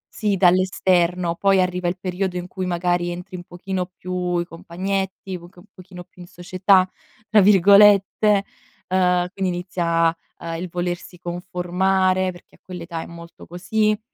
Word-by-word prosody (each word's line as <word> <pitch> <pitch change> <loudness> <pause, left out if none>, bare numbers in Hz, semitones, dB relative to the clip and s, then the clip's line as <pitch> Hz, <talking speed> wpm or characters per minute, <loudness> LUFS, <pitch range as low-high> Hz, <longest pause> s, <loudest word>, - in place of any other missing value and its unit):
Sì, 205 -3 0
dall'esterno, 180 -1 +2
poi 195 0 +3
arriva 180 -1 0
il 175 - -2
periodo 185 0 -3
in 180 - -5
cui 185 0 -5
magari 175 0 0
entri 180 +2 -7
un 175 - -7
pochino 180 +1 -5
più: 180 -1 -2
i 170 - -1
compagnetti, 190 +3 -4
un 175 0 -10 0.2
pochino 180 -1 -12
più 180 - -18
in 175 - -11
"società" 185 +2 +2 0.4
tra 215 -1 +5
virgolette, 200 +1 +5 0.4
uhm, 180 -1 +2
quindi 190 -2 -1
inizia, 170 -2 0 0.2
uhm, 165 0 -5
il 180 +1 -5
volersi 175 +1 -4
conformare, 185 +2 0
perché 175 - -18
a - - -51
quell'età 170 -2 -7
è - - -9
molto 170 0 -12
così, 210 +4 0
180 Hz, 150 wpm, -21 LUFS, 175-190 Hz, 0.4 s, tra